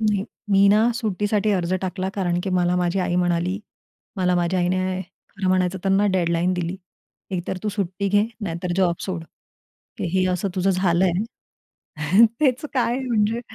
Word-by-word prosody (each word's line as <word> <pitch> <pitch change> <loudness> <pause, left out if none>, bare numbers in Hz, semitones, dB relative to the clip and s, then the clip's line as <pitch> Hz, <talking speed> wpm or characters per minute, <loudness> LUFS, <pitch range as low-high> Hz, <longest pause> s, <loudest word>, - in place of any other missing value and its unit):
नाही, 210 -3 +1 0.3
मी 195 0 +5
ना 210 +2 +5
सुट्टीसाठी 210 -2 0
अर्ज 180 -2 0
टाकला, 185 0 -2
कारण 175 -3 0
की 195 - -2
मला 180 -1 +2
माझी 180 +1 0
आई 175 -1 -1
म्हणाली, 175 +1 0 0.6
मला 180 -1 +2
माझ्या 175 +1 +1
आईने 185 +1 0 0.3
खरं 195 -2 -3
म्हणायचं 185 0 +1
त्यांना 195 +1 +3
डेडलाईन 175 0 +1
दिली. 175 +1 -3 0.5
"एक 180 -2 -2
तर 190 - -2
तू 215 - -1
सुट्टी 200 -1 -2
घे, 205 +1 +3 0.2
नाही 170 -6 -3
तर 180 - -1
जॉब 180 -3 +3
सोड." 180 -4 -4 0.8
हे 185 +2 +1
असं 180 +2 -1
तुझं 190 0 +1
झालं 185 -1 +2
आहे. 185 -2 0 0.2
तेच 265 -2 +2
काय 245 -1 +1
म्हणजे 230 -3 0
185 Hz, 165 wpm, -23 LUFS, 180-205 Hz, 0.8 s, मी